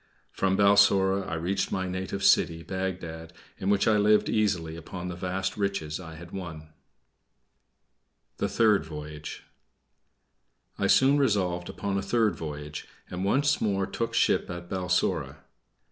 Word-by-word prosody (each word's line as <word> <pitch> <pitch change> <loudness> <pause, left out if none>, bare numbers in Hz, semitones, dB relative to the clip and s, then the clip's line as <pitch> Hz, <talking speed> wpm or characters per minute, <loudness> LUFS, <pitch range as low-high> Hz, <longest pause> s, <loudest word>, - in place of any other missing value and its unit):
From 95 0 0
Balsora 100 -1 +4
I 85 - -2
reached 90 +5 -1
my 95 -1 -1
native 95 +2 -4
city, 85 -4 +3
Bagdad, 85 -3 -5 0.3
in 95 - -1
which 100 -1 +2
I 110 -1 +4
lived 105 +1 +4
easily 95 -7 0
upon 90 +2 -7
the 90 - -5
vast 95 +3 -3
riches 100 -7 -2
I 80 -3 -9
had 85 +2 -11
won. 80 -5 -7 1.7
THE - - -1
THIRD 105 -6 +3
VOYAGE 75 -1 -8 1.4
I - - +2
soon 140 +2 +5
resolved 95 -9 0
upon 100 -1 -2
a - - -2
third 105 -1 +1
voyage, 75 -2 -7 0.2
and 90 +1 -3
once 135 +8 +2
more 100 -2 +1
took 115 +4 -3
ship - - +2
at 85 0 -7
Balsora. 90 -1 -1
95 Hz, 140 wpm, -27 LUFS, 85-100 Hz, 1.7 s, soon